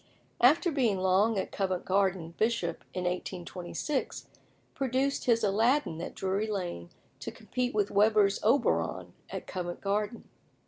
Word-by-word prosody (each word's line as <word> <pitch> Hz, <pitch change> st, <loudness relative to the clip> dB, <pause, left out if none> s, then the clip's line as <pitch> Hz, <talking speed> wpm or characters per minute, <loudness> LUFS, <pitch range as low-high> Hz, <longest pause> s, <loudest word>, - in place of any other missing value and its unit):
After 305 Hz, +8 st, +5 dB
being 245 Hz, -9 st, +2 dB
long 190 Hz, +4 st, +3 dB
at 190 Hz, -, -2 dB
Covent 185 Hz, -2 st, -2 dB
Garden, 190 Hz, -3 st, +1 dB
Bishop, 215 Hz, -7 st, 0 dB
in 180 Hz, -, -3 dB
1826, 180 Hz, -, -3 dB, 0.4 s
produced 270 Hz, +1 st, 0 dB
his 230 Hz, -2 st, +3 dB
"Aladdin" 215 Hz, -, +2 dB
at -, -, -6 dB
Drury 195 Hz, +3 st, -1 dB
Lane 175 Hz, -, -4 dB, 0.3 s
to -, -, -5 dB
compete 250 Hz, -2 st, -3 dB
with 205 Hz, -1 st, +1 dB
Weber's 205 Hz, -1 st, +4 dB
"Oberon" 245 Hz, +6 st, +1 dB, 0.2 s
at -, -, -6 dB
Covent 175 Hz, -2 st, -5 dB
Garden. 210 Hz, +3 st, -2 dB
200 Hz, 130 wpm, -30 LUFS, 185-235 Hz, 0.4 s, After